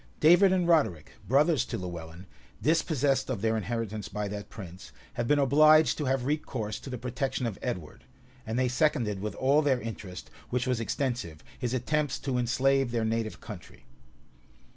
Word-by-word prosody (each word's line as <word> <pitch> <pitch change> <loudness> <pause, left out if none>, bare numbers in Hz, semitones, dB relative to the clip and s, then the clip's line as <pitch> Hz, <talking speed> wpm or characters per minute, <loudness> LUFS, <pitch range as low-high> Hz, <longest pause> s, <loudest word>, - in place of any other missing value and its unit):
David 175 +5 +6
and 180 -2 +2
Roderic, 150 - +2 0.2
brothers 150 +4 +3
to - - -4
Lewellyn, 85 -1 -7 0.3
dispossessed 145 -4 +1
of 115 -6 -3
their 110 0 +2
inheritance 110 -1 -3
by 105 +1 -3
that 105 0 -6
prince, 95 -3 -10 0.2
had 120 - -2
been 145 - +4
obliged 155 +3 +5
to 150 - -1
have 130 -1 0
recourse 135 -7 -2
to - - -9
the 125 - -4
protection 125 +2 -2
of 115 -5 -4
Edward, 90 -12 -5 0.4
and 110 +2 -3
they 130 0 +2
seconded 125 -6 +1
with 105 -1 -4
all 140 +3 +3
their 140 -4 +2
interest, 105 -6 -8 0.2
which 125 0 0
was 125 -3 0
extensive, 115 - -3 0.2
his 125 -1 -1
attempts 145 +3 0
to 130 -3 -2
enslave 135 +2 +2
their 115 -1 -1
native 110 -1 -2
country. - - -11
125 Hz, 165 wpm, -28 LUFS, 110-140 Hz, 0.4 s, David